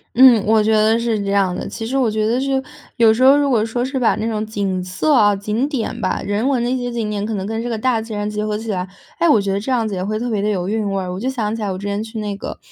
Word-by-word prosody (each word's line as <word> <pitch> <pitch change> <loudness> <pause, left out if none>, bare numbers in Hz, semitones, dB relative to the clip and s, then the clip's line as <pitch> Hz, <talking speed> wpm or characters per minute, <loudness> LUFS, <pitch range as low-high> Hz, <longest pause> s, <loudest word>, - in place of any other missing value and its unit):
嗯， 245 -4 +7
我 220 0 +4
觉 220 +1 +2
得 215 +1 +4
是 230 -2 -1
这 200 - -3
样 195 -3 +2
的。 - - -5
其 225 - -6
实 250 +4 -3
我 260 -4 +2
觉 215 0 -1
得 240 +3 +1
是 270 -1 0 0.4
有 225 -1 +6
时 225 - -3
候 275 +2 +7
如 285 - +2
果 235 -6 +2
说 240 +2 -2
是 265 0 -3
把 235 - +3
那 220 - -3
种 215 -1 -2
景 200 -4 -2
色 185 +12 0
啊、 205 -6 +5
景 215 +7 -2
点 240 -4 -3
吧， - - -1
人 205 +5 0
文 260 -4 +1
的 240 - 0
一 255 - 0
些 245 -1 -3
景 225 -3 -2
点 205 -1 -2
可 220 +1 -2
能 190 -1 -3
跟 225 +2 -3
这 240 - -4
个 230 - -2
大 230 0 +1
自 225 +1 -9
然 205 0 -2
结 210 0 -3
合 210 0 -1
起 225 +1 -7
来， 185 -1 -2 0.3
哎， 340 - +3
我 260 - +5
觉 200 -1 -1
得 195 - 0
这 220 +6 -4
样 235 -3 +1
子 210 - -4
也 185 0 -2
会 215 +2 -2
特 240 +2 -3
别 215 -4 -1
地 210 - 0
有 185 -3 -1
韵 210 -1 -1
味 195 - -1
儿。 180 -1 -4
我 185 - -5
就 255 +5 -2
想 225 -4 -2
起 230 - -6
来 205 -2 -2
我 185 - -4
之 200 - -8
前 205 +1 -2
去 225 0 -8
那 205 -1 -3
个， 195 - -7
220 Hz, 360 characters per minute, -19 LUFS, 205-240 Hz, 0.4 s, 嗯